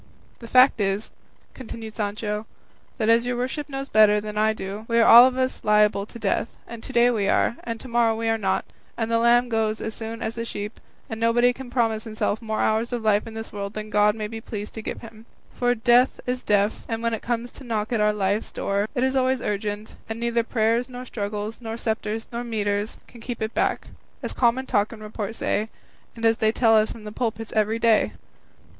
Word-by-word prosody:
"The 230 - -10
fact 255 -2 +5
is," 195 +2 -1 0.4
continued 225 -3 -8
Sancho, 210 0 -3 0.5
"that, 220 -4 0
as 230 +1 +4
your 245 -1 -1
worship 265 +4 -3
knows 270 0 -4
better 210 -2 +5
than 210 0 -6
I 215 +1 +3
do, 205 0 -6
we 230 - +1
are 230 - +6
all 240 +2 +10
of 260 0 -3
us 260 0 -1
liable 210 -1 +3
to - - -10
death, 215 +1 -1
and 235 -1 -8
to - - -8
day 240 +1 +4
we 205 -4 0
are, 235 - +2
and 230 -1 -4
to - - -10
morrow 235 -2 +2
we 225 0 -2
are 225 0 +2
not, 190 -2 0 0.3
and 225 -1 -2
the 230 - +3
lamb 240 +1 +4
goes 220 -2 0
as 220 - -4
soon 225 +1 -6
as 220 - -2
the 230 - -4
sheep, 210 -1 -6 0.3
and 225 - -6
nobody 240 +2 +3
can 255 0 -9
promise 225 -3 0
himself 215 0 -2
more 220 -1 -2
hours 220 +3 +1
of 240 -2 -3
life 210 0 +2
in 225 - -9
this 225 0 -7
world 200 0 -5
than 215 0 -6
God 210 0 +4
may 215 -1 -3
be 225 +1 -7
pleased 210 -2 -6
to 220 - -6
give - - -5
him; 225 0 -13 0.3
for 245 0 +1
death 240 +2 +3
is 250 0 -2
deaf, 205 -1 +1
and 225 0 -3
when 230 0 0
it 225 - -3
comes 240 0 -2
to - - -13
knock 225 -2 -2
at 220 - +1
our 210 0 +4
life's 205 +1 -1
door, 200 +1 -1
it 250 - +1
is 265 +1 +1
always 260 0 +2
urgent, 210 0 -3 0.2
and 225 +1 -4
neither 235 0 +1
prayers, 230 +2 +1
nor 250 0 -7
struggles, 210 -1 -4
nor 225 -1 -5
sceptres, 220 -1 -3
nor 235 0 -3
mitres, 205 -2 -2
can 235 - -15
keep 240 0 -5
it 220 +1 -3
back, - - 0 0.3
as - - -4
common 250 +2 +2
talk 210 -4 +1
and 220 -2 -10
report 215 0 -5
say, 215 0 -1 0.5
and 230 0 -4
as 225 0 +4
they 220 0 +2
tell 225 -1 +4
us 215 0 +4
from 225 - -9
the 210 - -7
pulpits 225 -1 -3
every 215 +1 +2
day." 230 -2 +3
225 Hz, 225 wpm, -24 LUFS, 215-235 Hz, 0.5 s, all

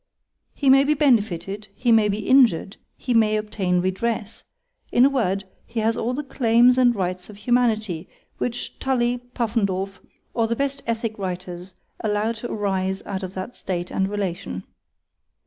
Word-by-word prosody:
_—He 285 - -1
may 270 +1 +7
be 300 +2 +2
benefitted,—he 210 - +1
may 220 -2 +5
be 205 +1 -2
injured,—he 245 -1 +2
may 215 -2 +4
obtain 195 -4 0
redress; 210 +3 -2 0.5
in 245 - +6
a 280 - +4
word, 200 -7 0 0.2
he 230 - -3
has 225 +1 +2
all 240 +2 -1
the 295 - -3
claims 245 -2 +4
and 245 -2 +4
rights 185 -1 -3
of 210 - -11
humanity, 215 -6 0 0.3
which 245 0 -4
Tully, 245 -2 +1 0.2
Puffendorf, 200 -5 -1 0.3
or 230 -1 +1
the 230 - 0
best 275 +2 -2
ethick 225 -2 -2
writers 180 -1 -5 0.2
allow 210 +1 0
to 230 +1 -6
arise 190 -2 -1
out 195 -1 -4
of 185 0 -6
that 190 +6 -5
state 180 -2 -4
and 190 0 0
relation. 175 - -3
215 Hz, 150 wpm, -23 LUFS, 190-240 Hz, 0.5 s, may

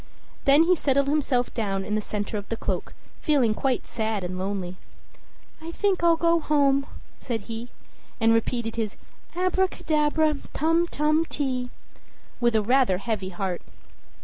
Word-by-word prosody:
Then 280 +3 +6
he 360 +2 +4
settled 280 -3 +1
himself 275 -4 +1
down 195 -4 -2
in 210 - -3
the 215 - +1
center 210 0 -4
of 205 -1 -5
the 230 - -2
cloak, - - -3 0.2
feeling 270 -8 +2
quite 255 +2 -1
sad 220 -3 -2
and 180 +1 -4
lonely. 190 -2 -3 0.8
"I 330 +1 -6
think 385 -1 0
I'll 335 -1 +6
go 335 0 +3
home," 280 -3 +2 0.3
said 230 -4 -3
he, 225 +3 -7 0.5
and 225 0 +4
repeated 230 0 -1
his 220 -2 -2 0.4
"Abracadabra, 315 -4 +1 0.2
tum 330 +3 +2
tum 305 +1 +1
ti!" 255 -5 -2 0.7
with 240 -2 +2
a 215 - +3
rather 245 -4 +3
heavy 200 -1 -3
heart. 185 -1 -3
250 Hz, 150 wpm, -25 LUFS, 215-305 Hz, 0.8 s, Then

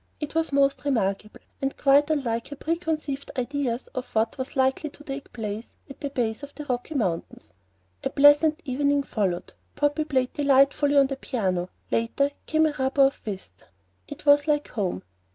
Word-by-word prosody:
It 300 -1 -5
was 325 -1 0
most 275 0 +2
remarkable, 210 -6 -1 0.2
and 270 0 -2
quite 285 +2 +4
unlike 240 -7 -1
her 285 - -7
preconceived 310 -3 -3
ideas 255 -1 -2
of 255 - -5
what 220 +1 +1
was 260 - -5
likely 265 +3 +1
to 295 - -16
take 275 -1 -7
place 215 0 -6 0.2
at - - -13
the 285 - -2
base 235 -4 -2
of 285 0 -10
the 295 - -7
Rocky 250 +3 -3
Mountains. 170 - -3 0.5
A - - 0
pleasant 290 +3 +5
evening 285 +1 +1
followed. 190 -9 -2 0.2
"Poppy" 290 +1 +1
played 260 -4 0
delightfully 280 0 +3
on 275 - +7
the 270 0 -4
piano; 185 -10 -2 0.2
later 255 +5 +1 0.2
came 315 0 +3
a 310 - +1
rubber 265 +1 +3
of 270 +1 +2
whist. 190 - -7 0.4
It - - -10
was 285 0 +5
like 295 -1 +1
home. 185 - -2
275 Hz, 170 wpm, -25 LUFS, 230-290 Hz, 0.5 s, on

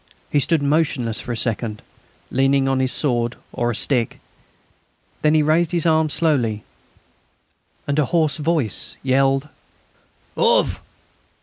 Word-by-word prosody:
He 145 - +3
stood 155 +1 +1
motionless 140 -6 0
for 125 - -6
a 120 - -3
second, 110 -2 -2 0.5
leaning 135 +1 +2
on 135 -1 +1
his 130 -1 +2
sword 120 -4 +1 0.2
or 120 - -1
a 120 - -2
stick; 120 0 0 1.0
then 155 0 +3
he 155 - +4
raised 160 +3 +1
his 170 -2 0
arm 160 -1 +3
slowly, 125 -10 0 1.2
and 145 +1 0
a 150 - +3
hoarse 160 0 +1
voice 150 - -1
yelled: 135 +1 +2 0.9
"_Auf! 480 +1 +2
140 Hz, 130 wpm, -21 LUFS, 120-155 Hz, 1.2 s, he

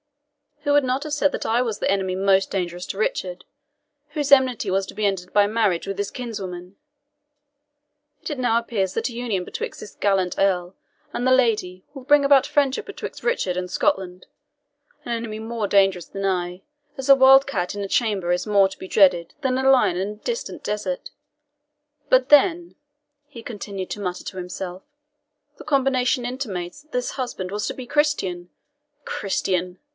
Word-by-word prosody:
Who 290 - +2
would 290 0 +5
not 260 +2 -1
have 305 -1 -5
said 290 -1 +2
that - - -4
I 235 +2 +2
was 230 -4 -2
that - - 0
enemy 190 -2 0
most 195 0 +2
dangerous 180 -2 -3
to - - -5
Richard, 185 -4 -2 0.6
whose 295 -2 -3
enmity 260 -4 +4
was 195 +1 +1
to - - -9
be 215 - -1
ended 185 -2 -2
by 205 -1 +5
marriage 210 -6 0
with 195 - -4
his 205 - -2
kinswoman? 190 -6 -6 1.4
Yet - - -6
it 290 - -4
now 235 -2 +2
appears 200 -5 -2
that 225 +3 -1
a - - -9
union 230 -6 -2
betwixt - - -6
this 205 - -10
gallant 190 -3 +1
Earl 185 -2 +1 0.4
and 245 - -2
the 255 - +3
lady 215 -8 +2
will 270 -3 -9
bring 290 +1 +5
about 275 -2 +5
friendship 285 -2 +1
betwixt 410 - -7
Richard 330 - 0
and 180 0 -3
Scotland, 185 0 -1 0.8
an - - -4
enemy 230 -2 -3
more 225 -1 -3
dangerous 195 -4 +3
than 195 0 -5
I, 180 -1 -1 0.4
as 265 +1 -5
a 275 - +10
wildcat 265 -9 +4
in 205 - -4
a 200 - -3
chamber 195 -5 0
is 180 +4 0
more 200 -2 +5
to - - -11
be 190 - -7
dreaded 180 -4 +3
than 260 -2 0
a 265 0 +2
lion 250 -9 +4
in 190 +2 -1
a 210 - -7
distant 470 - -5
desert. 195 -4 -3 1.0
But 255 +1 +4
then," 340 +4 +4 0.5
he 240 -6 -11
continued 200 -5 -6
to - - -4
mutter 180 -2 -4
to 190 - -7
himself, 180 0 -6 0.7
"the - - -10
combination 265 -2 +1
intimates 245 -3 -5
that 310 - -34
this 250 0 -2
husband 240 -8 -4
was 210 +1 -2
to - - -2
be 255 - -8
Christian. 195 - 0 0.6
Christian!" 185 -2 -2
210 Hz, 180 wpm, -23 LUFS, 185-260 Hz, 1.4 s, a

